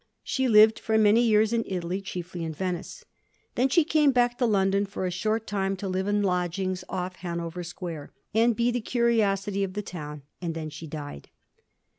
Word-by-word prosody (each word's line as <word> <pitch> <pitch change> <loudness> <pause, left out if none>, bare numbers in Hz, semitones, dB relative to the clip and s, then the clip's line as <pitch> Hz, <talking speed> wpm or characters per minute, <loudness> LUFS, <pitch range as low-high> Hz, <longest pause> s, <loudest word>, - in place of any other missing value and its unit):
She 265 -1 0
lived 220 -1 +6
for 220 0 +1
many 215 +2 +5
years 220 -1 +3
in 230 -1 +1
Italy, 180 0 -3
chiefly 180 -2 -6
in 160 -1 -3
Venice. 180 0 -4 0.5
Then 255 +3 +2
she 330 +5 +4
came 300 -2 +3
back 245 -1 +2
to 245 - +3
London 200 -1 +2
for 195 -1 -4
a 180 - -1
short 215 +5 -1
time 195 -1 -1
to 195 - -4
live 190 +1 -1
in 205 0 +1
lodgings 180 0 -1
off 185 0 -4
Hanover 170 -1 -4
Square, 170 -3 -7 0.2
and 230 +1 +3
be 240 +2 +2
the 245 0 -1
curiosity 210 -4 +1
of 190 -1 -3
the 210 +1 -3
town; 150 -6 -7 0.2
and 170 -2 -3
then 155 -1 -5
she 160 +2 -8
died. 145 - -8
195 Hz, 190 wpm, -27 LUFS, 175-220 Hz, 0.5 s, lived